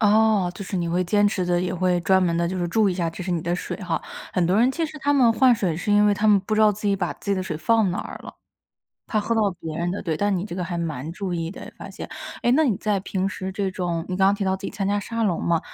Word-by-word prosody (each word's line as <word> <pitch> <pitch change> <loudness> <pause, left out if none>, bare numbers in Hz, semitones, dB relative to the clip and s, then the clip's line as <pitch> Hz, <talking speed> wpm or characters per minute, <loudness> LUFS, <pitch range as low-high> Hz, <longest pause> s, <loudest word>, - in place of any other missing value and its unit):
哦， 215 -3 +4
就 200 - -7
是 190 - -4
你 170 -2 -1
会 180 +2 +1
坚 205 +3 +3
持 190 -3 -1
地， 175 0 +1
也 180 0 -2
会 180 0 +1
专 190 +2 +3
门 170 -2 +1
地 170 0 +1
就 185 +1 -3
是 175 - 0
注 215 +3 +3
意 - - +1
一 - - -4
下， 175 -2 -1
这 165 +3 -7
是 180 - -4
你 175 -2 0
的 170 +2 -1
水 180 - -4
哈。 175 -4 -3 0.3
很 180 - +1
多 180 +3 +2
人 245 +3 +4
其 330 +4 -1
实 310 -1 -7
他 285 +1 +2
们 255 -5 +5
换 255 +2 +5
水， 185 -7 -1
是 205 +5 -1
因 205 0 +5
为 205 - +4
他 210 +2 0
们 210 -2 +6
不 205 +3 -2
知 215 - +2
道 215 -1 +6
自 210 +1 -5
己 200 - +2
把 180 -3 -2
自 200 - -6
己 - - +3
的 185 - -2
水 160 -4 -4
放 220 +6 +2
哪 175 - -3
儿 - - -6
了， - - -9 0.7
怕 215 - 0
喝 220 +3 -1
到 225 - +2 0.2
别 160 -1 -5
人 170 +1 -1
的， 200 - -4
对， 160 -4 -1
但 205 +2 +1
你 180 - -2
这 180 -4 -6
个 180 - -2
还 175 0 -4
蛮 160 -3 -3
注 190 0 -4
意 165 -1 -2
的， - - -10
发 - - -8
现。 - - -8 0.3
诶， 240 - +3
那 315 +4 +4
你 230 -9 +1
在 210 0 0
平 190 0 -2
时 190 -1 -5
这 195 0 -1
种 175 -3 -2
你 185 - -2
刚 190 0 +4
刚 200 - +4
提 200 -1 -3
到 190 0 +1
自 195 - -7
己 - - -4
参 195 -2 -2
加 205 +1 +1
沙 230 +3 -3
龙 190 -6 0
嘛， 170 -1 +2
190 Hz, 345 characters per minute, -23 LUFS, 175-210 Hz, 0.7 s, 们